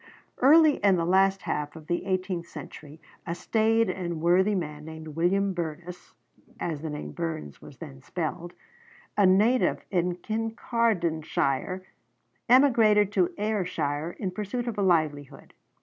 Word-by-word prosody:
Early 305 Hz, +3 st, +6 dB
in 200 Hz, -2 st, +3 dB
the 170 Hz, -2 st, 0 dB
last 195 Hz, +1 st, +3 dB
half 150 Hz, +1 st, -3 dB
of 160 Hz, -1 st, -11 dB
the 175 Hz, +3 st, -2 dB
eighteenth 185 Hz, -2 st, -2 dB
century 150 Hz, -1 st, -11 dB, 0.3 s
a 170 Hz, -, -2 dB
staid 225 Hz, +3 st, +1 dB
and 175 Hz, -3 st, -3 dB
worthy 185 Hz, +5 st, +3 dB
man, 150 Hz, -4 st, -4 dB
named 160 Hz, 0 st, -9 dB
William 185 Hz, +5 st, +1 dB
Burness 175 Hz, +1 st, -6 dB, 0.5 s
(as 160 Hz, -4 st, -3 dB
the 160 Hz, -, -4 dB
name 150 Hz, 0 st, -6 dB
Burns 160 Hz, -, -5 dB
was -, -, -13 dB
then 70 Hz, 0 st, -10 dB
spelled), 175 Hz, +1 st, -5 dB, 0.6 s
a 200 Hz, -2 st, +4 dB
native 215 Hz, +7 st, +3 dB
of 180 Hz, -1 st, -1 dB
Kincardineshire, 190 Hz, -, -1 dB, 0.7 s
emigrated 225 Hz, -6 st, +5 dB
to 185 Hz, -4 st, +1 dB
Ayrshire 175 Hz, -7 st, -2 dB
in 190 Hz, -3 st, -3 dB
pursuit 215 Hz, +5 st, -4 dB
of 225 Hz, -3 st, -3 dB
a -, -, +2 dB
livelihood. 155 Hz, -6 st, -1 dB
180 Hz, 135 wpm, -27 LUFS, 160-210 Hz, 0.7 s, Early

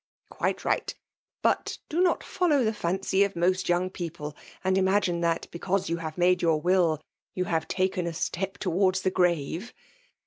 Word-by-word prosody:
— -, -, -76 dB
Quite -, -, -1 dB
ligbt. -, -, -1 dB, 0.5 s
But -, -, +1 dB
do 335 Hz, +3 st, 0 dB
not 365 Hz, -, +2 dB
follow 305 Hz, -8 st, +2 dB
tbe 220 Hz, -, +1 dB
fimcy 190 Hz, 0 st, +1 dB
of 200 Hz, -1 st, -2 dB
mosi 185 Hz, +2 st, +1 dB
young 180 Hz, +1 st, +1 dB
people^ 165 Hz, -5 st, -5 dB, 0.3 s
and 190 Hz, 0 st, +2 dB
imagine 190 Hz, -2 st, +2 dB
tibat, 165 Hz, -1 st, 0 dB
because 190 Hz, +1 st, -1 dB
you 170 Hz, -, +1 dB
baye 160 Hz, -2 st, -5 dB
made 180 Hz, 0 st, +3 dB
your 165 Hz, -2 st, +3 dB
will, 175 Hz, -2 st, +2 dB, 0.4 s
you 185 Hz, -, 0 dB
hare 165 Hz, -2 st, +1 dB
taken 185 Hz, +1 st, -1 dB
a 170 Hz, -, -3 dB
step 190 Hz, +3 st, -3 dB
towards 185 Hz, 0 st, +1 dB
tbe 185 Hz, -, +1 dB
grave! 175 Hz, -, 0 dB
180 Hz, 175 wpm, -27 LUFS, 170-190 Hz, 0.5 s, made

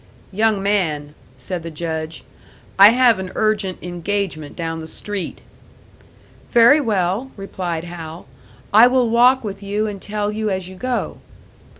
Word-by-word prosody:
"Young 215 Hz, 0 st, +1 dB
man," 155 Hz, -8 st, -1 dB, 0.2 s
said 170 Hz, +8 st, -5 dB
the 165 Hz, -, -7 dB
Judge, 160 Hz, 0 st, -5 dB, 0.6 s
"I 200 Hz, +1 st, +11 dB
have 240 Hz, -2 st, +4 dB
an 185 Hz, -1 st, -5 dB
urgent 210 Hz, -4 st, 0 dB
engagement 175 Hz, -3 st, -3 dB
down 165 Hz, -1 st, -4 dB
the 160 Hz, -, -8 dB
street." 205 Hz, +3 st, -5 dB, 1.1 s
"Very 240 Hz, +6 st, +6 dB
well," 210 Hz, +1 st, -1 dB
replied 180 Hz, -4 st, -4 dB
Hal, 170 Hz, -1 st, -8 dB, 0.5 s
"I 220 Hz, +4 st, +8 dB
will 250 Hz, -2 st, +2 dB
walk 250 Hz, +2 st, +4 dB
with 200 Hz, -2 st, -6 dB
you 205 Hz, +2 st, -2 dB
and 205 Hz, -3 st, -5 dB
tell 210 Hz, 0 st, -3 dB
you 215 Hz, 0 st, -2 dB
as 190 Hz, -2 st, -3 dB
you 190 Hz, -, -10 dB
go." 250 Hz, +5 st, -3 dB
195 Hz, 140 wpm, -20 LUFS, 170-215 Hz, 1.1 s, I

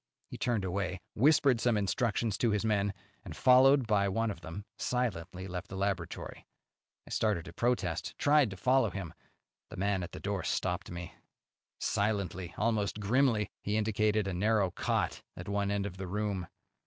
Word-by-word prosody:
He -, -, -6 dB
turned 115 Hz, -6 st, 0 dB
away, 95 Hz, -1 st, -2 dB
whispered 135 Hz, -1 st, +4 dB
some 120 Hz, -3 st, +3 dB
instructions 105 Hz, +1 st, 0 dB
to 120 Hz, -, +3 dB
his 105 Hz, 0 st, 0 dB
men, 100 Hz, -2 st, +2 dB, 0.3 s
and, -, -, -8 dB
followed 130 Hz, +1 st, +6 dB
by 100 Hz, -3 st, +2 dB
one 115 Hz, +3 st, 0 dB
of 85 Hz, -, -9 dB
them, 85 Hz, +6 st, -7 dB
silently 95 Hz, -7 st, -2 dB
left 90 Hz, -1 st, -5 dB
the 95 Hz, -, -8 dB
laboratory. 95 Hz, -4 st, -3 dB, 0.6 s
I -, -, -13 dB
started 105 Hz, -6 st, +1 dB
to 85 Hz, -, -10 dB
protest, 105 Hz, -7 st, -1 dB
tried 145 Hz, -4 st, +4 dB
to 95 Hz, -, -8 dB
follow 130 Hz, +6 st, +3 dB
him; 90 Hz, -5 st, -6 dB, 0.6 s
the -, -, -9 dB
man 100 Hz, 0 st, +1 dB
at 90 Hz, -, -5 dB
the -, -, -8 dB
door 100 Hz, -1 st, -2 dB
stopped -, -, -1 dB
me. 85 Hz, -1 st, -7 dB, 0.7 s
Silently, 95 Hz, -4 st, -1 dB
almost 110 Hz, -2 st, 0 dB
grimly, 115 Hz, 0 st, +2 dB
he 105 Hz, +1 st, -1 dB
indicated 110 Hz, -1 st, +1 dB
a 95 Hz, -, -2 dB
narrow 100 Hz, 0 st, +2 dB
cot -, -, -1 dB, 0.2 s
at 85 Hz, -, -7 dB
one 100 Hz, 0 st, 0 dB
end 100 Hz, -1 st, 0 dB
of 95 Hz, -2 st, -6 dB
the 95 Hz, 0 st, -5 dB
room. 100 Hz, -2 st, -2 dB
100 Hz, 170 wpm, -31 LUFS, 95-115 Hz, 0.7 s, followed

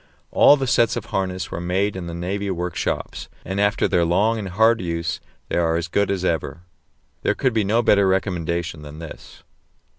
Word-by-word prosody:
All 145 Hz, -, +6 dB
the 135 Hz, -, -1 dB
sets 120 Hz, -2 st, +3 dB
of -, -, -4 dB
harness 95 Hz, -1 st, -3 dB
were 85 Hz, -, -4 dB
made 95 Hz, +3 st, 0 dB
in 90 Hz, -2 st, -5 dB
the 85 Hz, -, -5 dB
navy 100 Hz, +4 st, -3 dB
workshops, 90 Hz, -1 st, -3 dB, 0.2 s
and 95 Hz, +2 st, -2 dB
after 100 Hz, 0 st, +2 dB
their 85 Hz, -, +2 dB
long 105 Hz, +7 st, +2 dB
and 100 Hz, -3 st, -5 dB
hard 110 Hz, +4 st, +3 dB
use 85 Hz, -1 st, -2 dB, 0.3 s
they -, -, -2 dB
are 85 Hz, -1 st, +2 dB
as 85 Hz, +1 st, -1 dB
good 100 Hz, +3 st, +1 dB
as 95 Hz, -2 st, -1 dB
ever. 80 Hz, -1 st, -2 dB, 0.6 s
There -, -, +1 dB
could 130 Hz, -3 st, +1 dB
be 110 Hz, -2 st, +2 dB
no 110 Hz, +4 st, +2 dB
better 100 Hz, -3 st, +4 dB
recommendation 85 Hz, -4 st, -1 dB
than 75 Hz, 0 st, -10 dB
this. 80 Hz, -1 st, -11 dB
95 Hz, 190 wpm, -22 LUFS, 85-100 Hz, 0.6 s, All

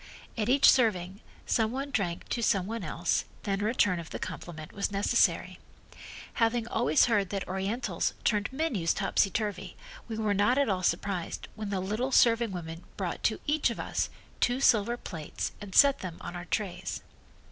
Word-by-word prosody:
At 220 Hz, 0 st, -1 dB
each 275 Hz, +2 st, +6 dB
serving 195 Hz, -6 st, +1 dB, 0.3 s
some 220 Hz, -1 st, +1 dB
one 275 Hz, +3 st, -4 dB
drank 180 Hz, -9 st, -2 dB
to 235 Hz, -, -1 dB
some 195 Hz, -5 st, +2 dB
one 225 Hz, 0 st, -4 dB
else, 165 Hz, +1 st, 0 dB, 0.2 s
then 195 Hz, -1 st, -1 dB
a -, -, 0 dB
return 205 Hz, -5 st, +2 dB
of 165 Hz, -, -8 dB
the -, -, -5 dB
compliment 155 Hz, -3 st, -7 dB
was 200 Hz, 0 st, -2 dB
necessary. 200 Hz, 0 st, +2 dB, 0.8 s
Having 230 Hz, 0 st, +2 dB
always 155 Hz, -, +3 dB
heard 205 Hz, -5 st, +1 dB
that 195 Hz, -1 st, -3 dB
Orientals 195 Hz, +6 st, -2 dB
turned 210 Hz, 0 st, +1 dB
menus 260 Hz, -, 0 dB
topsy 195 Hz, 0 st, +2 dB
turvy 210 Hz, +1 st, -3 dB, 0.3 s
we 225 Hz, -2 st, -5 dB
were 215 Hz, -2 st, +1 dB
not 205 Hz, +6 st, +3 dB
at 280 Hz, -4 st, +3 dB
all 185 Hz, -2 st, 0 dB
surprised 185 Hz, -1 st, -2 dB
when 215 Hz, -2 st, -5 dB
the 195 Hz, -2 st, -1 dB
little 215 Hz, +8 st, -2 dB
serving 230 Hz, -3 st, +4 dB
women 165 Hz, -2 st, -6 dB
brought -, -, -3 dB
to -, -, +1 dB
each 295 Hz, -2 st, +2 dB
of 235 Hz, -, -5 dB
us -, -, -1 dB, 0.3 s
two 245 Hz, +1 st, +2 dB
silver 235 Hz, -2 st, +3 dB
plates 160 Hz, -9 st, -5 dB
and 200 Hz, -3 st, -8 dB
set 280 Hz, -1 st, +7 dB
them 180 Hz, -3 st, -6 dB
on 175 Hz, -, -7 dB
our 175 Hz, 0 st, -6 dB
trays. 195 Hz, +1 st, -3 dB
205 Hz, 180 wpm, -29 LUFS, 185-235 Hz, 0.8 s, set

